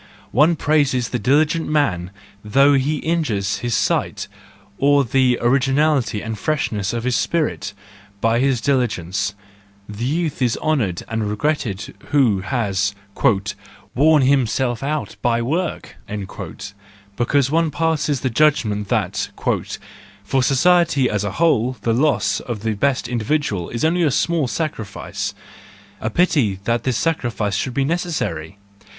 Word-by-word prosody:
One 150 Hz, +7 st, +4 dB
praises 140 Hz, -6 st, +1 dB
the 125 Hz, -, -2 dB
diligent 150 Hz, +7 st, +2 dB
man 100 Hz, -, +1 dB, 0.3 s
though 140 Hz, +7 st, +4 dB
he 140 Hz, +3 st, +1 dB
injures 135 Hz, -13 st, -1 dB
his 120 Hz, -2 st, -1 dB
sight, -, -, -1 dB, 0.5 s
or 140 Hz, 0 st, +4 dB
the 125 Hz, 0 st, +2 dB
originality 135 Hz, -1 st, +2 dB
and 110 Hz, -1 st, -5 dB
freshness 110 Hz, -10 st, -1 dB
of 115 Hz, -1 st, -3 dB
his 125 Hz, 0 st, 0 dB
spirit, 155 Hz, -, -1 dB, 0.4 s
by 115 Hz, +2 st, +2 dB
his 130 Hz, -2 st, +1 dB
diligence; 105 Hz, -7 st, 0 dB, 0.5 s
the 105 Hz, +2 st, -6 dB
youth 155 Hz, +1 st, -1 dB
is 120 Hz, -2 st, +1 dB
honoured 125 Hz, -, -1 dB
and 110 Hz, -2 st, -2 dB
regretted 105 Hz, -3 st, -2 dB
who 125 Hz, -9 st, +3 dB
has 100 Hz, -2 st, -1 dB, 1.0 s
"worn 150 Hz, +1 st, +4 dB
himself 130 Hz, -2 st, +1 dB
out 150 Hz, +2 st, -3 dB
by 120 Hz, -1 st, +2 dB
work," 160 Hz, +9 st, -3 dB, 1.2 s
because 135 Hz, +3 st, +1 dB
one 165 Hz, 0 st, +2 dB
passes 155 Hz, -3 st, 0 dB
the 130 Hz, -, -1 dB
judgment^ 110 Hz, -7 st, +2 dB
that -, -, -1 dB, 1.0 s
"for 135 Hz, -, +1 dB
society 145 Hz, 0 st, +3 dB
as 105 Hz, -1 st, -1 dB
a 100 Hz, -, -3 dB
whole 130 Hz, -7 st, +2 dB
the 115 Hz, -, +1 dB
loss 140 Hz, +5 st, +2 dB
of 115 Hz, -5 st, -6 dB
the 110 Hz, -1 st, 0 dB
best 130 Hz, +5 st, 0 dB
individual 115 Hz, -, -1 dB
is 115 Hz, +5 st, -2 dB
only 175 Hz, +2 st, +2 dB
a 160 Hz, -, +3 dB
small 160 Hz, +1 st, +1 dB
sacrifice! 120 Hz, -9 st, -4 dB, 0.6 s
A 110 Hz, -, -2 dB
pity 130 Hz, -, +2 dB
that 115 Hz, +1 st, -1 dB
this 130 Hz, -4 st, +1 dB
sacrifice 115 Hz, -10 st, -1 dB
should 120 Hz, +5 st, -2 dB
be 135 Hz, -, +1 dB
necessary 105 Hz, -, -2 dB
130 Hz, 135 wpm, -20 LUFS, 110-150 Hz, 1.2 s, One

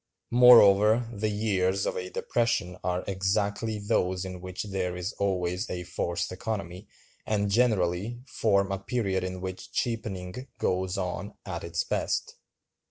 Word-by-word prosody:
Moreover, 115 Hz, -2 st, +7 dB
the 110 Hz, 0 st, -1 dB
years 100 Hz, -3 st, +1 dB
of -, -, -1 dB
a 90 Hz, 0 st, -4 dB
depression 115 Hz, -7 st, 0 dB
are 90 Hz, 0 st, -1 dB
exactly 100 Hz, +3 st, 0 dB
those 95 Hz, -3 st, 0 dB
in 90 Hz, -1 st, -7 dB
which 90 Hz, 0 st, -5 dB
there 95 Hz, -3 st, -2 dB
is 90 Hz, +3 st, -4 dB
always 90 Hz, +1 st, -1 dB
a 90 Hz, -1 st, -4 dB
forced 85 Hz, 0 st, -2 dB
economy, 95 Hz, -1 st, -5 dB, 0.4 s
and 100 Hz, -2 st, 0 dB
generally 105 Hz, -1 st, +1 dB
form 100 Hz, -6 st, +1 dB
a 95 Hz, -, -1 dB
period 95 Hz, -4 st, -1 dB
in 95 Hz, 0 st, -4 dB
which 95 Hz, 0 st, -6 dB
cheapening 110 Hz, 0 st, -3 dB
goes 95 Hz, +1 st, 0 dB
on 95 Hz, +1 st, -4 dB
at 85 Hz, -3 st, -5 dB
its 85 Hz, 0 st, -1 dB
best. -, -, -1 dB
95 Hz, 140 wpm, -28 LUFS, 90-110 Hz, 0.4 s, Moreover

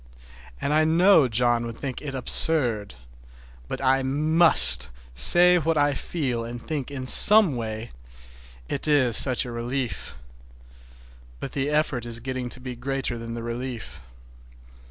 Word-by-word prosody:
And 140 Hz, -, -3 dB
I 155 Hz, +1 st, +2 dB
know 165 Hz, -1 st, +3 dB
John 120 Hz, 0 st, 0 dB
would 115 Hz, -1 st, -10 dB
think 135 Hz, -3 st, -7 dB
it 140 Hz, -3 st, -8 dB
absurd. 120 Hz, -, +1 dB, 0.7 s
But -, -, -7 dB
I 135 Hz, +1 st, +1 dB
must 140 Hz, -, +2 dB, 0.2 s
say 175 Hz, -, +6 dB
what 165 Hz, 0 st, -2 dB
I 145 Hz, 0 st, +1 dB
feel 130 Hz, -5 st, -5 dB
and 120 Hz, +1 st, -8 dB
think 145 Hz, +1 st, -6 dB
in 135 Hz, -2 st, -8 dB
some 205 Hz, +2 st, +5 dB
way—it -, -, -9 dB
is 130 Hz, -6 st, +1 dB
such 130 Hz, -2 st, +3 dB
a 120 Hz, -, -8 dB
relief! 120 Hz, +1 st, -6 dB, 1.2 s
But 135 Hz, -, -8 dB
the 140 Hz, +1 st, -4 dB
effort 150 Hz, -6 st, -2 dB
is 115 Hz, 0 st, -4 dB
getting 130 Hz, 0 st, -6 dB
to 125 Hz, -, -9 dB
be 125 Hz, -1 st, -9 dB
greater 130 Hz, -1 st, -5 dB
than 115 Hz, 0 st, -8 dB
the 115 Hz, -, -8 dB
relief. 120 Hz, 0 st, -8 dB
125 Hz, 140 wpm, -23 LUFS, 115-145 Hz, 1.2 s, say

